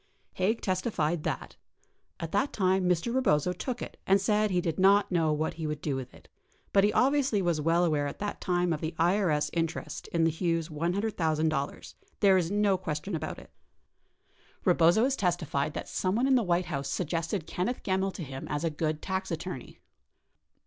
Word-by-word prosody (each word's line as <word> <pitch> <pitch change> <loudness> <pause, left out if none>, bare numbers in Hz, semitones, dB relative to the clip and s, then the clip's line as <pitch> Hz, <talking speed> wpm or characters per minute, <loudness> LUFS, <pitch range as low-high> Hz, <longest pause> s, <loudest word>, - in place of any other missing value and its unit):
Haig 205 +5 0
testified 175 -5 0
that - - -4 0.6
"[a]t 165 -2 -5
that 205 +8 +1
time 185 -2 +2
Mr. 180 +7 +1
Rebozo 180 - +2
took 245 +7 -4
it - - -9
and 195 +1 +5
said 210 +2 +2
he 180 -2 +1
did 170 0 -2
not 200 +2 +5
know 165 -3 +2
what 155 +1 -1
he 160 -1 -4
would 150 -1 -3
do 145 -2 -2
with 130 -2 -5
it, - - -18 0.5
but 195 - +5
he 205 - +4
obviously 270 -3 +2
was 170 -5 0
well 165 +3 +3
aware 150 -3 +1
at - - -6
that 205 0 -4
time 175 -2 +1
of 150 - -4
the 160 +1 -3
IRS 165 -4 +2
interest 165 -2 -3
in 170 -1 0
the 165 - +3
Hughes 165 0 -1
$100,000, 160 -3 -1 0.3
there 195 -2 +5
is 175 -3 +1
no 200 -2 +2
question 160 +2 -4
about 160 - -3
it." - - -14 0.8
55 - - -32
Rebozo 170 +7 +5
has 265 +1 +2
testified 160 - -1
that - - -4
someone 205 +7 0
in 270 - +3
the 255 - +5
White 180 -3 +1
House 140 0 -3
suggested 165 +2 -2
Ken 180 +3 -2
neth 245 - -4
Gemmill 190 0 0
to 170 - -6
him 135 -2 -7
as 145 +2 -2
a 165 - 0
good 155 0 -2
tax 190 0 -2
attorney. 165 -5 -6
175 Hz, 190 wpm, -29 LUFS, 155-195 Hz, 0.8 s, and